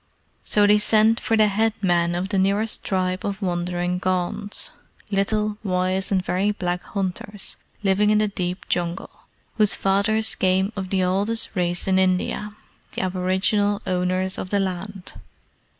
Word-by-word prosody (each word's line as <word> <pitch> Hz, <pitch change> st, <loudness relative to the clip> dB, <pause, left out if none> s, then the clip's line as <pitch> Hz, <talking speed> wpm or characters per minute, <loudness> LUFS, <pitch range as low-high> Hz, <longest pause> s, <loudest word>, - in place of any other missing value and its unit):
So 205 Hz, -1 st, +3 dB
they 210 Hz, +1 st, +5 dB
sent 220 Hz, +2 st, +4 dB
for 225 Hz, -, 0 dB
the 215 Hz, -, +6 dB
head 215 Hz, +2 st, +1 dB
man 175 Hz, -3 st, +1 dB
of 180 Hz, +2 st, -2 dB
the 195 Hz, -, +1 dB
nearest 200 Hz, +3 st, +1 dB
tribe 185 Hz, -1 st, -1 dB
of 200 Hz, -1 st, -3 dB
wandering 175 Hz, -1 st, -1 dB
Gonds 185 Hz, +2 st, -1 dB, 0.4 s
little, 210 Hz, +1 st, 0 dB
wise, 185 Hz, 0 st, 0 dB
and 185 Hz, -2 st, +1 dB
very 190 Hz, +3 st, +1 dB
black 180 Hz, -3 st, -2 dB
hunters, 195 Hz, +1 st, -5 dB, 0.3 s
living 200 Hz, +1 st, +3 dB
in 215 Hz, -, +4 dB
the 215 Hz, 0 st, +2 dB
deep 185 Hz, -2 st, -4 dB
Jungle, 175 Hz, 0 st, -2 dB, 0.5 s
whose 215 Hz, -2 st, +4 dB
fathers 210 Hz, +3 st, +1 dB
came 190 Hz, +2 st, +1 dB
of 190 Hz, -2 st, -4 dB
the 190 Hz, -1 st, +1 dB
oldest 200 Hz, +5 st, +1 dB
race 175 Hz, -1 st, 0 dB
in 190 Hz, 0 st, +3 dB
India 190 Hz, +3 st, 0 dB, 0.4 s
the -, -, -2 dB
aboriginal 190 Hz, +3 st, +1 dB
owners 185 Hz, +1 st, -1 dB
of 185 Hz, -, -5 dB
the 200 Hz, -, +1 dB
land. 190 Hz, 0 st, -4 dB
190 Hz, 150 wpm, -23 LUFS, 185-205 Hz, 0.5 s, the